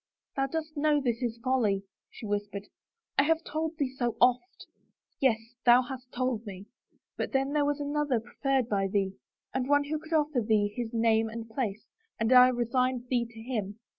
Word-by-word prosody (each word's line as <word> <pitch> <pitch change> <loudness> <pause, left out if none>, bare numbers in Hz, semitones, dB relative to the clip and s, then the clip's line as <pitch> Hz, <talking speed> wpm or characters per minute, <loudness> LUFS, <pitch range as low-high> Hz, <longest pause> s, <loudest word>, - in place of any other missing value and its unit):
"Thou 270 0 +1
dost 310 +2 -4
know 295 0 +3
this 240 -3 -1
is 235 -2 -2
folly," 220 -7 +1 0.3
she - - -10
whispered. 205 -1 -3 0.2
* 460 -9 -7
I - - +9
have 325 +1 +2
told 315 +1 -3
thee 275 -4 -1
so 240 -3 -1
oft." 250 +9 +2 0.3
" - - -50
Yes, 260 -5 +4 0.3
thou 245 +1 +6
hast 250 0 -8
told 250 -3 -1
me, 195 -3 -8 0.5
but - - -3
then 270 +1 +1
there 295 -1 +2
was 290 0 0
another 290 -3 0
preferred 265 +2 -1
by 195 -3 +1
thee 195 -1 0 0.2
— - - -54
and 260 0 -1
one 290 0 +4
who 300 +2 -3
could 315 +2 -8
offer 300 -4 +2
thee 210 -2 +1
his 235 -2 -3
name 225 -1 +2
and 225 0 -7
place. 220 -3 -3 0.3
And 225 +3 +3
I 250 0 +9
resigned 250 0 0
thee 240 -2 +1
to 225 -1 -13
him. 215 -5 -3
250 Hz, 195 wpm, -29 LUFS, 225-285 Hz, 0.5 s, I